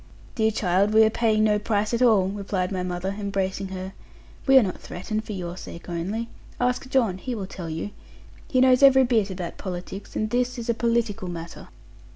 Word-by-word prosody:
'Dear 220 -2 +2
child, 200 0 +1
we 220 - +8
are 220 - +4
paying 220 -2 +2
no 210 -1 +3
price 210 +1 0
at 235 - 0
all,' 215 -7 +5
replied 195 -2 -2
my 185 -2 -2
mother, 180 +2 -3
embracing 195 -1 -2
her; 190 0 -6 0.5
'we 270 0 +7
are 260 - +7
not 185 -3 -3
threatened 215 +4 -4
for 215 - -6
your 175 -2 -5
sake 170 -2 -10
only. 195 +7 -3 0.3
Ask 250 +1 0
John, 230 -9 +1
he 250 +4 -4
will 200 -3 -4
tell 180 -3 -7
you. 160 +6 -4 0.6
He 255 - +2
knows 255 0 +5
every 265 -1 +7
bit 225 -5 +2
about 180 -2 -6
politics, 185 +1 -6
and 215 0 -1
this 250 +1 0
is 235 0 -1
a - - 0
political 230 -4 0
matter.' 170 -1 -7
205 Hz, 195 wpm, -25 LUFS, 185-230 Hz, 0.6 s, we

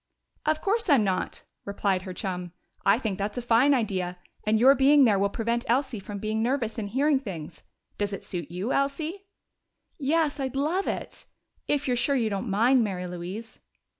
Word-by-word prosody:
"Of 310 0 +2
course 425 0 0
I'm 275 -7 +5
not!" 190 -2 -2 0.2
replied 200 -2 0
her 185 -1 -7
chum. 180 -3 -4 0.3
"I 200 +2 +5
think 215 -6 -3
that's 205 +2 -3
a - - -1
fine 240 +4 +4
idea, 185 -7 -1 0.3
and 215 0 +3
your 260 +4 +7
being 280 +1 +5
there 205 -4 +3
will 200 0 +2
prevent 235 +3 -1
Elsie 255 -2 +1
from 200 +1 -7
being 215 +2 -2
nervous 235 -2 -1
and 205 -2 -4
hearing 275 +5 +2
things. 170 - -8 0.4
Does 205 0 0
it 195 - -5
suit 170 -5 -5
you, 185 +8 -2
Elsie?" 315 +8 -2 0.7
"Yes! 300 +1 +1
Oh, 270 - 0
I'd 260 - -5
love 315 +8 0
it! - - -4 0.4
If 290 -1 0
you're 250 - +2
sure 245 +4 +1
you 225 -4 +1
don't 200 +3 -3
mind, 235 +5 +4
Mary 185 -4 -3
Louise." 180 +6 -7
225 Hz, 190 wpm, -27 LUFS, 195-275 Hz, 0.7 s, your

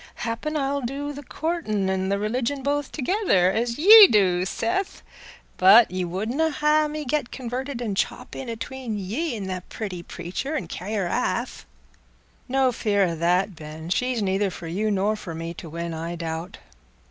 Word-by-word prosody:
Happen 235 +7 -2
I - - 0
shall 280 +1 -1
do 280 +4 -4
the 285 - -8
coortin' 290 - -2
an' 190 0 -1
the 200 - +1
religion 245 +6 -2
both 290 0 -1
together, 265 - +2
as 235 +3 -1
ye 415 +6 +10
do, 185 - +3
Seth; 370 - -2 0.5
but 200 +3 +7
ye 185 0 -2
wouldna 220 - -1
ha' 300 0 +2
me 300 0 -5
get 280 -1 -1
converted 255 0 -5
an' 215 -4 -2
chop 195 - -3
in 260 - -6
atween 230 -1 -5
ye 230 - -3
an' 210 - -5
the 185 -1 -4
pretty 190 -5 -5
preacher, 180 - -5
an' 185 - -3
carry 195 +6 -5
her 200 -3 0
aff?" 175 - -2 0.8
"No 265 0 +2
fear 210 -4 +1
o' 170 -3 0
that, 180 +4 +1
Ben; 155 +2 -8
she's 250 0 0
neither 195 +1 +1
for 175 - -9
you 195 +7 -1
nor 205 +1 +1
for 180 -6 -7
me 165 +1 -5
to 165 - -9
win, 170 +1 -4
I 165 +2 -4
doubt. 165 +3 -5
215 Hz, 180 wpm, -24 LUFS, 185-275 Hz, 0.8 s, ye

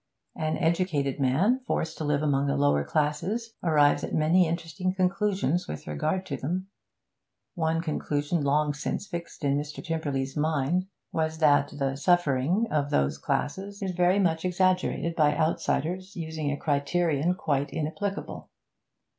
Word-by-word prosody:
An 155 0 -1
educated 165 -5 0
man 160 - +3
forced 160 0 -1
to - - -2
live 150 0 +1
among 140 -1 +2
the 140 +1 +1
lower 140 - +3
classes 170 - -1
arrives 150 -4 +3
at - - -3
many 165 +3 +4
interesting 170 +2 -2
conclusions 185 -3 +1
with 75 - -6
regard 75 - -1
to - - -4
them; 185 +7 -3 0.8
one 160 -1 0
conclusion 150 0 -1
long 145 +1 +2
since 150 - -3
fixed 170 -5 -7
in 140 0 +2
Mr. 150 0 -7
Tymperley's 145 -5 -2
mind 155 +4 0 0.2
was 160 0 -1
that 145 -3 +4
the 135 -1 -1
'suffering' 175 - +2
of 145 -2 +1
those 70 - +1
classes 200 +7 -2
is 190 - -1
very 180 +2 +3
much 165 -5 +1
exaggerated 185 -2 +1
by 150 -2 +3
outsiders 180 +4 -1
using 160 -3 -3
a 145 - -2
criterion 155 +3 +1
quite 145 -5 -1
inapplicable. 180 +6 -4
160 Hz, 145 wpm, -27 LUFS, 145-180 Hz, 0.8 s, many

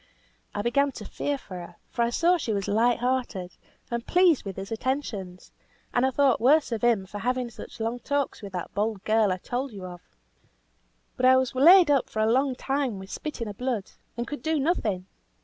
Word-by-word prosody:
I 205 - -1
began 280 +5 +2
to 215 - -8
fear 285 +6 -2
for 185 -8 -9
her, 175 - -10 0.2
for 235 - -2
I 235 - +3
saw 335 +9 +3
she 235 -9 -2
was 200 -2 -2
light 230 +4 +3
hearted, 245 -8 -2 0.4
and 235 0 -2
pleased 350 -5 +3
with 195 -2 -5
his 195 +2 -7
attentions; 220 -7 -4 0.4
and 245 +2 +3
I - - +2
thought 265 -2 +2
worse 285 +3 +4
of 230 - -2
him 230 -5 +3
for 205 +2 -7
having 250 +1 -1
such - - -11
long 230 +2 -2
talks 285 +1 -2
with 200 -2 -8
that 180 -2 -5
bold 210 -1 -1
girl 215 -2 +3
I 185 - -1
told 250 +8 -4
you 195 -3 -8
of. 180 -1 -9 1.2
But 255 - +3
I 260 0 +7
was 260 0 0
laid 330 +5 +7
up 275 -3 +2
for 215 - -4
a 220 +1 +3
long 265 +1 +2
time 270 -4 -1
with 190 +1 -10
spitting 280 -7 -5
of 205 -1 -8
blood; 245 -6 -2 0.3
and 235 - -2
could 290 +3 -6
do 315 -1 0
nothing. 220 - 0
240 Hz, 210 wpm, -26 LUFS, 205-275 Hz, 1.2 s, I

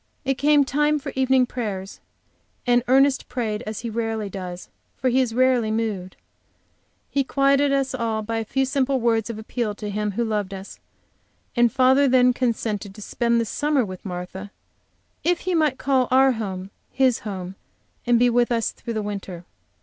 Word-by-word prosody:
It 270 - +2
came 295 0 +5
time 295 +2 +2
for 285 - -6
evening 260 -1 +3
prayers, 205 -6 -5 0.7
and 245 -1 +3
Ernest 270 +2 +3
prayed 220 -4 -2
as 215 +1 -4
he 235 - -4
rarely 225 -2 -2
does, 180 -2 -7 0.3
for 260 - +1
he 260 +2 +3
is 235 -3 -2
rarely 255 -3 +3
so - - -1
moved. 205 -5 -3 1.0
He 280 - +1
quieted 275 +1 +2
us 270 -1 0
all 225 -3 -1
by 225 +1 -2
a - - -2
few 265 +5 0
simple 270 0 0
words 225 -2 +1
of 230 - -5
appeal 220 -1 -3
to 210 -1 -5
Him 210 0 -2
who 235 +4 -1
loved 205 -3 -2
us, 190 +1 -10 0.8
and 240 -1 +4
father 265 +2 +4
then 250 -1 +5
consented 220 -5 -2
to 210 - -11
spend 235 +2 +1
the 230 - 0
summer 290 +2 0
with 185 -2 -9
Martha 185 +1 -6 0.7
if 350 0 +1
he 370 - -2
might 305 -5 +2
call 265 -2 +1
our 265 +1 +5
home 195 -5 -5 0.2
his 260 -3 +2
home, 190 -3 -6 0.5
and 240 -1 +5
be 245 +1 +4
with 240 0 +2
us 230 -1 +1
through 230 - -7
the 215 - -1
winter. 195 -4 -6
235 Hz, 180 wpm, -23 LUFS, 210-265 Hz, 1.0 s, came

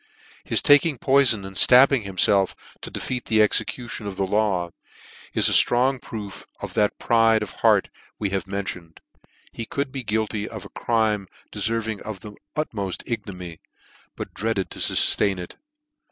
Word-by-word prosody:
His - - +1
taking 145 0 +5
poi 135 +4 +4
fon 110 -6 0
and 95 0 -9
ftabbing 130 +1 +6
himfelf, 95 0 +2 0.3
to - - -7
defeat 125 -2 -4
the 110 - +2
execution 110 +1 0
of 95 -2 -6
the 95 - 0
Jaw, 95 -4 0 0.6
is - - +4
a - - +3
ftrong 130 +1 +4
proof 105 -3 -8 0.2
of - - -7
that 105 -1 +1
pride 115 -2 +3
of 105 - -7
heart - - +3 0.3
we 100 -3 -2
have 95 -2 -2
mentioned. 95 -4 -6 0.5
He 115 - -7
could 140 -1 -3
be 135 -1 -5
guilty 110 -1 -2
of 110 -4 -9
a - - -10
crime 110 -4 0 0.2
deferving 110 -1 -2 0.2
the 105 +2 -10 0.2
utmoft 100 - -4
ignominy, 90 -8 -6 0.5
but - - -7
dreaded 110 -3 -2
to - - -8
fuftain 100 -2 +3
it. 90 -1 -9
110 Hz, 155 wpm, -23 LUFS, 95-120 Hz, 0.6 s, ftabbing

